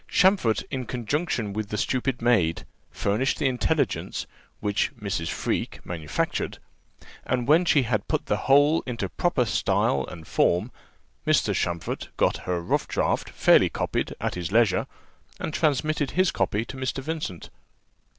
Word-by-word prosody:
Champfort, 185 Hz, -, +3 dB
in 130 Hz, -3 st, -3 dB
conjunction 125 Hz, -, -2 dB
with 105 Hz, 0 st, -3 dB
the 105 Hz, -, -3 dB
stupid 130 Hz, +1 st, -1 dB
maid, 90 Hz, -8 st, +2 dB, 0.2 s
furnished 110 Hz, +7 st, 0 dB
the 150 Hz, -, -1 dB
intelligence, 125 Hz, -2 st, 0 dB, 0.3 s
which 105 Hz, 0 st, 0 dB
Mrs. 95 Hz, -5 st, -2 dB
Freke -, -, -2 dB
manufactured; 80 Hz, -4 st, -2 dB, 0.7 s
and 125 Hz, -1 st, -1 dB
when 160 Hz, +5 st, +5 dB
she 150 Hz, -5 st, +4 dB
had 110 Hz, -4 st, -1 dB
put -, -, -1 dB
the -, -, +1 dB
whole 145 Hz, +4 st, +5 dB
into 120 Hz, -3 st, -3 dB
proper 175 Hz, -8 st, +1 dB
style 70 Hz, -, +1 dB
and 85 Hz, -3 st, -10 dB
form, 90 Hz, +10 st, +1 dB, 0.6 s
Mr. -, -, +3 dB
Champfort 85 Hz, -3 st, -2 dB
got -, -, +2 dB
her 90 Hz, -1 st, +1 dB
rough -, -, 0 dB
draught -, -, 0 dB
fairly -, -, +5 dB
copied -, -, -2 dB
at -, -, -1 dB
his 90 Hz, 0 st, -4 dB
leisure, 110 Hz, -3 st, +3 dB, 0.5 s
and 155 Hz, -, -4 dB
transmitted 150 Hz, -2 st, +1 dB
his 185 Hz, -1 st, +4 dB
copy 105 Hz, +3 st, 0 dB
to 135 Hz, -, -8 dB
Mr. 130 Hz, +1 st, -3 dB
Vincent. 150 Hz, -, -5 dB
120 Hz, 145 wpm, -25 LUFS, 100-140 Hz, 0.7 s, when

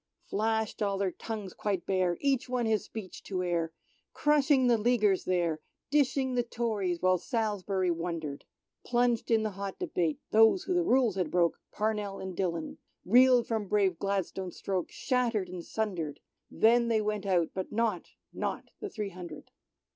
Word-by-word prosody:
Flashed 220 Hz, +1 st, -1 dB
all 200 Hz, -1 st, +1 dB
their 195 Hz, -1 st, 0 dB
tongues 210 Hz, -1 st, -6 dB
quite 195 Hz, -5 st, -2 dB
bare, 185 Hz, -3 st, +1 dB
each 275 Hz, -2 st, +1 dB
one 250 Hz, -2 st, 0 dB
his 220 Hz, -2 st, +1 dB
speech 210 Hz, -5 st, -8 dB
to 185 Hz, -2 st, -3 dB
air, 170 Hz, -2 st, 0 dB, 0.4 s
Crushing 290 Hz, -3 st, +3 dB
the 240 Hz, -2 st, +4 dB
Leaguers 210 Hz, -4 st, +2 dB
there, 170 Hz, -4 st, +1 dB, 0.3 s
dishing 265 Hz, -2 st, +2 dB
the 245 Hz, -, +2 dB
Tories 215 Hz, -7 st, -2 dB
while 185 Hz, -1 st, +4 dB
Salisbury 200 Hz, -4 st, -1 dB
wondered. 165 Hz, -4 st, -4 dB, 0.4 s
Plunged 240 Hz, -1 st, +1 dB
in 225 Hz, -2 st, +3 dB
the 215 Hz, -, -1 dB
hot 195 Hz, 0 st, -5 dB
debate, 165 Hz, -4 st, -1 dB
those 225 Hz, -, +5 dB
who 370 Hz, -, -1 dB
the 355 Hz, -, +3 dB
rules 255 Hz, -, +3 dB
had 180 Hz, -4 st, 0 dB
broke 170 Hz, 0 st, +2 dB
— -, -, -57 dB
Parnell 210 Hz, -2 st, -1 dB
and 190 Hz, -1 st, -6 dB
Dillon 170 Hz, -4 st, -2 dB
— -, -, -47 dB
reeled 245 Hz, +3 st, +6 dB
from 220 Hz, -3 st, -1 dB
brave 190 Hz, -4 st, +2 dB
Gladstone's 195 Hz, -2 st, -2 dB
stroke 185 Hz, -3 st, -2 dB
shattered 235 Hz, -7 st, 0 dB
and 180 Hz, -1 st, -6 dB
sundered; 175 Hz, -10 st, -3 dB, 0.3 s
Then 235 Hz, +1 st, +4 dB
they 225 Hz, -2 st, +2 dB
went 210 Hz, -1 st, -2 dB
out, 175 Hz, -4 st, +2 dB
but 190 Hz, -1 st, -4 dB
not 215 Hz, -5 st, -1 dB, 0.2 s
— -, -, -47 dB
not -, -, -3 dB
the 415 Hz, -, -5 dB
three 210 Hz, -, -4 dB
hundred. 180 Hz, -2 st, -10 dB
205 Hz, 170 wpm, -30 LUFS, 185-235 Hz, 0.4 s, reeled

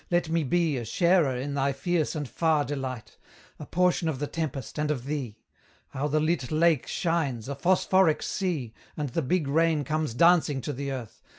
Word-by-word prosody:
let 175 Hz, -2 st, +1 dB
me 165 Hz, 0 st, +1 dB
be 160 Hz, 0 st, +1 dB
A 120 Hz, -, -3 dB
sharer 165 Hz, -, +2 dB
in 135 Hz, +3 st, -3 dB
thy 140 Hz, 0 st, +1 dB
fierce 160 Hz, +4 st, -1 dB
and 145 Hz, -2 st, -3 dB
far 155 Hz, 0 st, +1 dB
delight 130 Hz, -4 st, -5 dB, 0.4 s
A -, -, -8 dB
portion 180 Hz, -2 st, +1 dB
of 150 Hz, -, -2 dB
the 145 Hz, -, -2 dB
tempest 150 Hz, -3 st, -4 dB
and 150 Hz, 0 st, 0 dB
of 130 Hz, -5 st, -2 dB
thee! 135 Hz, -7 st, -4 dB, 0.5 s
How 140 Hz, +3 st, -2 dB
the 155 Hz, +1 st, +1 dB
lit 155 Hz, -4 st, 0 dB
lake 160 Hz, -3 st, +3 dB
shines, 160 Hz, -, -1 dB
a 140 Hz, -, -3 dB
phosphoric 185 Hz, +2 st, +2 dB
sea, 160 Hz, -, -2 dB, 0.2 s
And 150 Hz, -2 st, -2 dB
the 165 Hz, -, -1 dB
big 155 Hz, +2 st, 0 dB
rain 160 Hz, +1 st, +2 dB
comes 155 Hz, -5 st, -2 dB
dancing 165 Hz, -2 st, +4 dB
to 145 Hz, -, -4 dB
the 140 Hz, +1 st, -4 dB
earth! 125 Hz, -5 st, -7 dB
150 Hz, 190 wpm, -27 LUFS, 135-165 Hz, 0.5 s, dancing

